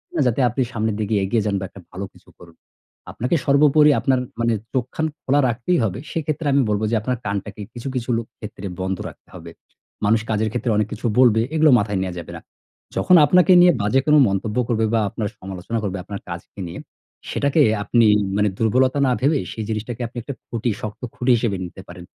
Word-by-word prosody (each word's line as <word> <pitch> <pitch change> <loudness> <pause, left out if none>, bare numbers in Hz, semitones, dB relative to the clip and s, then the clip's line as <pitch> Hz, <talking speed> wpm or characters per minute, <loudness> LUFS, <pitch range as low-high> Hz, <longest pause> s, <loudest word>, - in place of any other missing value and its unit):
না - - +1
যাতে 125 +3 +1
আপনি 130 - -2
সামনের 110 -2 -1
দিকে 105 +1 -2
এগিয়ে 105 +3 0
যান 100 - 0
বা 95 - -4
একটা 100 - -13
ভালো 95 +2 -5
কিছু - - -21
করুন। 85 -2 -16 0.6
আপনাকে 125 +8 -1
সর্বোপরি 150 +1 +5
আপনার 130 +2 +2 0.2
মানে 115 0 +2 0.2
চোখ 125 -3 0
খান 160 - 0 0.2
খোলা 140 +2 +2
রাখতেই 125 +10 0
হবে। 105 +1 -2
সেক্ষেত্রে 155 -1 -2
আমি 140 - +4
বলব 105 0 0
যে, 115 - +2
আপনার 125 +3 -2
কানটাকে 100 +1 -4
কিছু, 120 +3 -7
কিছু 125 0 -3
লোক 115 -1 -4
ক্ষেত্রে 100 -2 -8
বন্ধ 95 0 -2
রাখতে - - -19
হবে। - - -10 0.5
মানুষ 110 +2 +3
কাজের 110 0 0
ক্ষেত্রে 120 0 -1
অনেক 105 0 +1
কিছু 110 +3 -8
বলবে, 115 -4 +5
এগুলো 155 -2 +5
মাথায় 100 -2 -1
নেয়া 95 -1 -3
যাবে 85 - -9
না। - - -12 0.5
যখন 180 - +4
আপনাকে 180 +5 +4
নিয়ে 180 0 +7
বাজে 105 +6 +2
কোনো 150 0 +5
মন্তব্য 100 +3 -2
করবে 110 -2 +1
বা 115 - +3
আপনার 105 +1 -3
সমালোচনা 95 +4 -5
করবে 100 -1 -2
আপনার 100 +1 -7
কাজকে 85 +3 -9
নিয়ে, 85 - -8 0.5
সেটাকে 140 +2 +1 0.2
আপনি 115 +2 +3 0.3
মানে 105 0 +2
দুর্বলতা 130 +5 +2
না 125 - +2
ভেবে 145 +2 +2
সেই 110 - -5
জিনিসটাকে 110 +2 -4
আপনি 120 - -13
একটা 140 - -5
খুঁটি, 115 0 -2
শক্ত 110 +1 -6
খুঁটি 125 +1 +1
হিসেবে 110 -4 -1
নিতে 90 +2 -10
পারেন 90 0 -10
115 Hz, 205 wpm, -21 LUFS, 100-130 Hz, 0.6 s, নিয়ে